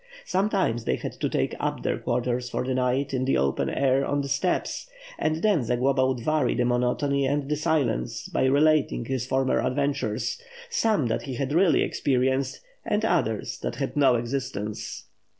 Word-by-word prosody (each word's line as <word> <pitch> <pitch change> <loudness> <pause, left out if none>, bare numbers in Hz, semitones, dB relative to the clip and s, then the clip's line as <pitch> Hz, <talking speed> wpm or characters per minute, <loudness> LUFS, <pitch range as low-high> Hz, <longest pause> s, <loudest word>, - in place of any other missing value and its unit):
Sometimes, 190 - 0
they - - +1
had - - -5
to - - -3
take - - 0
up - - -2
their - - -1
quarters 125 0 -1
for 125 - -2
the 130 - -1
night 130 +2 0
in 130 -1 0
the 135 - +2
open 70 0 0
air 135 0 +2
on 145 +1 0
the 140 - -4
steppes; 175 - -1 0.3
and 155 +1 0
then 200 - +3
Zagloba 130 +3 +1
would 130 -2 -1
vary 155 +1 +1
the 125 - +1
monotony 125 +3 +1
and 140 0 0
the 150 - 0
silence 145 - -1
by - - 0
relating 145 -2 +3
his 130 0 -2
former 130 0 +1
adventures, 130 -5 -1 0.3
some 220 - +2
that 115 - -1
he 130 - -4
had 135 +3 -2
really 170 -3 +4
experienced 130 - 0 0.2
and 210 +1 0
others 115 - 0
that - - -4
had 135 +1 -3
no 135 -4 +5
existence. 115 -4 -4
135 Hz, 175 wpm, -26 LUFS, 125-145 Hz, 0.3 s, no